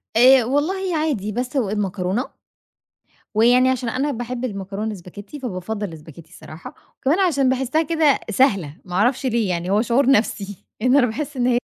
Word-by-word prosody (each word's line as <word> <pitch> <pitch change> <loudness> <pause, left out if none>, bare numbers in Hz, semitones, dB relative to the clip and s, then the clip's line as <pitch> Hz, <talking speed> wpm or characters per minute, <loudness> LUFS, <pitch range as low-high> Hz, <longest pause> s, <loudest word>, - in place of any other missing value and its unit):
آآ 255 +2 +7
والله 345 +8 -1
عادي، 285 -10 -1
باسلق 250 +1 -2
المكرونة، 200 +2 -2 1.1
ويعني 245 +4 +4
عشان 255 -2 -2
أنا 265 +5 -1
باحب 245 -1 -4
المكرونة 200 -2 -4
الاسباجيتي، 205 - -8
فبافضل 205 -2 -4
الاسباجيتي 160 -1 -13
الصراحة. 155 +1 -11 0.2
وكمان 290 +7 +1
عشان 285 -8 +2
باحسها 265 +4 +1
كده 320 -3 +2
سهلة 195 - +1
ما 180 - -9
أعرفش 245 +8 +1
ليه، 235 -4 0
يعني 175 +1 -2
هو 205 +2 +3
شعور 250 +3 +2
نفسي 205 -5 0 0.2
لأنه 255 +4 +4
أنا 250 - +4
باحس 290 +5 -5
إن 245 -1 +1
هي 245 -1 +3
240 Hz, 160 wpm, -21 LUFS, 200-270 Hz, 1.1 s, آآ